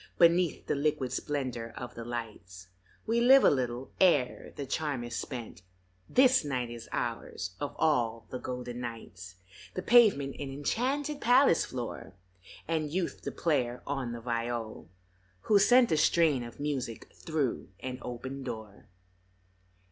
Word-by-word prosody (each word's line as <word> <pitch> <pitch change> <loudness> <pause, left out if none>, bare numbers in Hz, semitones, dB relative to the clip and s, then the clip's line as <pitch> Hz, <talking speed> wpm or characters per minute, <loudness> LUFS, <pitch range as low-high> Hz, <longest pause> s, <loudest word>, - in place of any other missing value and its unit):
Beneath 170 -1 +4
the - - 0
liquid 145 -3 0
splendor 130 -6 -3
of 125 0 -6
the 115 - -7
lights 105 -6 -7 0.4
We 230 +1 +1
live 265 +2 +7
a - - +7
little 125 -1 -2
ere 150 -9 +3
the 140 - -5
charm 140 -2 -2
is 120 - -5
spent; 120 -6 -6 0.5
This 260 -3 +5
night 125 -5 -2
is 120 -1 -9
ours, 95 0 -3
of 145 - -4
all 115 -7 +1
the 125 - -4
golden 125 -1 -5
nights, 95 -6 -8 0.4
The 185 - -3
pavement 205 - +5
an 140 -2 -4
enchanted 270 - -1
palace 245 -5 +5
floor, 120 -6 -6 0.5
And 155 -2 -1
Youth 180 +2 -2
the - - -4
player 125 -7 -1
on 135 -4 -3
the 120 0 -6
viol, 115 -4 -3 0.5
who 210 -2 +4
sent 245 +4 +5
A 160 - +3
strain 155 -3 +3
of 120 -1 -9
music 135 -6 -4
thru 155 -6 -2
an 130 -1 -5
open 130 +3 -6
door. 110 -5 -8
130 Hz, 145 wpm, -30 LUFS, 120-160 Hz, 0.5 s, live